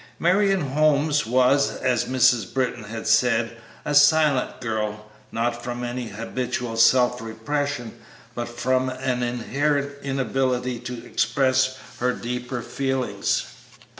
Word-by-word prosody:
Marion 195 Hz, +2 st, +2 dB
Holmes 150 Hz, 0 st, +2 dB
was, 130 Hz, +3 st, +3 dB
as 125 Hz, -3 st, 0 dB
Mrs. 125 Hz, -5 st, +2 dB
Britton 125 Hz, -5 st, -2 dB
had 110 Hz, +1 st, -7 dB
said, 120 Hz, -2 st, +2 dB, 0.3 s
a 150 Hz, -, -1 dB
silent 145 Hz, -2 st, +4 dB
girl; 105 Hz, -3 st, -3 dB, 0.3 s
not 120 Hz, +1 st, -2 dB
from 120 Hz, 0 st, -4 dB
any 120 Hz, 0 st, -4 dB
habitual 115 Hz, +2 st, -4 dB
self 125 Hz, +1 st, +4 dB
repression, 120 Hz, +2 st, -4 dB, 0.3 s
but 120 Hz, 0 st, -4 dB
from 130 Hz, +2 st, 0 dB
an 130 Hz, -1 st, -2 dB
inherent 140 Hz, +4 st, -1 dB
inability 130 Hz, -2 st, -1 dB
to 125 Hz, -1 st, -7 dB
express 130 Hz, +2 st, +1 dB, 0.2 s
her 125 Hz, +1 st, +1 dB
deeper 125 Hz, 0 st, -4 dB
feelings. 135 Hz, +1 st, -1 dB
125 Hz, 115 wpm, -24 LUFS, 120-135 Hz, 0.3 s, silent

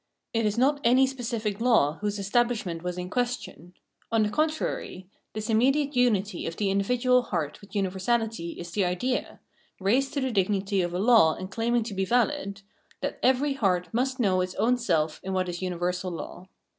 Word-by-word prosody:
It 225 Hz, -1 st, +2 dB
is 210 Hz, +2 st, -2 dB
not 280 Hz, +3 st, +2 dB
any 255 Hz, +3 st, +5 dB
specific 230 Hz, -5 st, -3 dB
law 220 Hz, -, +3 dB
whose 210 Hz, 0 st, -1 dB
estabhshment 200 Hz, -4 st, 0 dB
was 180 Hz, 0 st, -4 dB
in 180 Hz, 0 st, -4 dB
question; 240 Hz, -8 st, -3 dB, 0.4 s
on 225 Hz, -1 st, +3 dB
the 210 Hz, -, -1 dB
contrary, 305 Hz, -10 st, -2 dB, 0.3 s
the 215 Hz, 0 st, -4 dB
immediate 275 Hz, +6 st, +2 dB
unity 210 Hz, -6 st, +1 dB
of 165 Hz, -, -4 dB
the 200 Hz, -2 st, 0 dB
individual 250 Hz, +6 st, +2 dB
heart 170 Hz, -10 st, -3 dB
with 200 Hz, -, -16 dB
universahty 195 Hz, -1 st, -1 dB
is 175 Hz, -1 st, -7 dB
the 200 Hz, +3 st, +1 dB
idea 185 Hz, +9 st, -2 dB, 0.2 s
— -, -, -37 dB
raised 245 Hz, +8 st, +1 dB
to 280 Hz, -, 0 dB
the 260 Hz, -1 st, -1 dB
dignity 195 Hz, -1 st, +1 dB
of 175 Hz, 0 st, -2 dB
a -, -, -1 dB
law 215 Hz, -7 st, +5 dB
and 185 Hz, +1 st, -7 dB
claiming 230 Hz, +2 st, +1 dB
to 220 Hz, -2 st, -6 dB
be 190 Hz, 0 st, -1 dB
vahd 235 Hz, -2 st, 0 dB, 0.2 s
— -, -, -33 dB
that -, -, -3 dB
every 265 Hz, +3 st, +3 dB
heart 185 Hz, -8 st, 0 dB
must 260 Hz, +3 st, 0 dB
know 190 Hz, -5 st, +2 dB
its 185 Hz, 0 st, -3 dB
own 245 Hz, +3 st, +2 dB
self 160 Hz, -10 st, 0 dB
in 190 Hz, -, -3 dB
what 185 Hz, -1 st, 0 dB
is 175 Hz, 0 st, -5 dB
universal 180 Hz, 0 st, -2 dB
law. 180 Hz, +1 st, -8 dB
210 Hz, 190 wpm, -27 LUFS, 185-245 Hz, 0.4 s, any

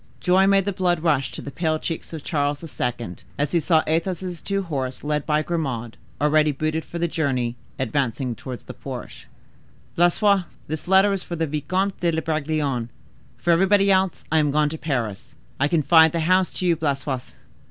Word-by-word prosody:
Joy 185 Hz, +7 st, +4 dB
made 195 Hz, -1 st, +4 dB
the 200 Hz, -, 0 dB
blood 175 Hz, -3 st, 0 dB
rush 145 Hz, -5 st, +1 dB
to -, -, -7 dB
the 140 Hz, -, -6 dB
pale 160 Hz, 0 st, 0 dB
cheeks 165 Hz, +1 st, -5 dB
of 160 Hz, -3 st, -7 dB
Charles 145 Hz, -1 st, -1 dB, 0.2 s
II., 120 Hz, -7 st, -2 dB, 0.2 s
as 145 Hz, 0 st, 0 dB
he 170 Hz, -, +3 dB
saw 160 Hz, -1 st, +3 dB
Athos's 175 Hz, +1 st, -2 dB
two 195 Hz, 0 st, -1 dB
horses, 135 Hz, -7 st, -4 dB
led 150 Hz, 0 st, -1 dB
by 150 Hz, 0 st, +2 dB
Grimaud, 130 Hz, -9 st, -3 dB, 0.2 s
already 150 Hz, +1 st, +3 dB
booted 155 Hz, +3 st, -2 dB
for 170 Hz, -, -7 dB
the 170 Hz, 0 st, +1 dB
journey, 130 Hz, -7 st, -1 dB, 0.2 s
advance 130 Hz, -1 st, -1 dB, 0.2 s
towards 125 Hz, +2 st, -8 dB
the -, -, -9 dB
porch. -, -, -8 dB, 0.7 s
"Blaisois, 185 Hz, +2 st, +3 dB, 0.2 s
this 155 Hz, +2 st, -5 dB
letter 195 Hz, +2 st, +5 dB
for 175 Hz, -, -6 dB
the 165 Hz, 0 st, 0 dB
Vicomte 185 Hz, +7 st, -1 dB
de 170 Hz, -2 st, +1 dB
Bragelonne. 150 Hz, -6 st, -1 dB, 0.5 s
For 175 Hz, -, +1 dB
everybody 195 Hz, +3 st, +4 dB
else 190 Hz, -2 st, +1 dB
I 160 Hz, -, +4 dB
am 150 Hz, -1 st, +2 dB
gone 150 Hz, +1 st, +2 dB
to 160 Hz, -, -5 dB
Paris. 120 Hz, -10 st, -3 dB, 0.2 s
I 145 Hz, -, +3 dB
confide 160 Hz, 0 st, +5 dB
the 170 Hz, -, 0 dB
house 185 Hz, +3 st, +3 dB
to 185 Hz, -, -3 dB
you, 170 Hz, -1 st, +4 dB
Blaisois." 140 Hz, -4 st, -2 dB
155 Hz, 180 wpm, -23 LUFS, 145-175 Hz, 0.7 s, letter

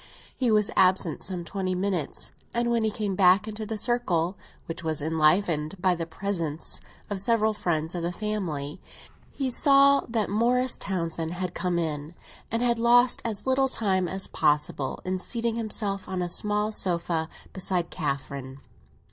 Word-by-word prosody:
He 255 Hz, -3 st, +1 dB
was 210 Hz, -2 st, +3 dB
absent 185 Hz, -4 st, +3 dB
some 180 Hz, -2 st, -4 dB
twenty 185 Hz, 0 st, -2 dB
minutes, 185 Hz, -4 st, -2 dB, 0.2 s
and 235 Hz, 0 st, +1 dB
when 230 Hz, -1 st, +2 dB
he 220 Hz, -, +2 dB
came 210 Hz, -2 st, -2 dB
back 190 Hz, +3 st, +5 dB
into 215 Hz, 0 st, -5 dB
the 220 Hz, 0 st, -3 dB
circle, 200 Hz, -7 st, 0 dB, 0.3 s
which 165 Hz, 0 st, -6 dB
was 160 Hz, -2 st, 0 dB
enlivened 160 Hz, +2 st, +2 dB
by 185 Hz, 0 st, +3 dB
the 165 Hz, -1 st, -4 dB
presence 165 Hz, -3 st, -2 dB, 0.3 s
of 200 Hz, -, -1 dB
several 220 Hz, +1 st, +3 dB
friends 165 Hz, -5 st, -1 dB
of 175 Hz, -, -3 dB
the 170 Hz, +1 st, -1 dB
family, 180 Hz, -7 st, -3 dB, 0.5 s
he 270 Hz, -2 st, -2 dB
saw 275 Hz, +1 st, +6 dB
that 225 Hz, -2 st, 0 dB
Morris 245 Hz, +4 st, +2 dB
Townsend 165 Hz, -3 st, -3 dB
had 180 Hz, 0 st, -3 dB
come 180 Hz, 0 st, -1 dB
in 155 Hz, -1 st, -3 dB, 0.3 s
and 230 Hz, +1 st, 0 dB
had 235 Hz, -1 st, +2 dB
lost 245 Hz, +1 st, +4 dB
as 220 Hz, -4 st, -3 dB
little 265 Hz, 0 st, +2 dB
time 190 Hz, -7 st, +1 dB
as 190 Hz, +2 st, 0 dB
possible 145 Hz, -2 st, 0 dB
in 185 Hz, 0 st, -1 dB
seating 230 Hz, +3 st, 0 dB
himself 210 Hz, -3 st, -2 dB
on 185 Hz, -1 st, -1 dB
a 175 Hz, -, -2 dB
small 210 Hz, +3 st, 0 dB
sofa, 170 Hz, -4 st, 0 dB, 0.2 s
beside 180 Hz, -2 st, -1 dB
Catherine. 140 Hz, -2 st, -4 dB
190 Hz, 160 wpm, -27 LUFS, 165-220 Hz, 0.5 s, saw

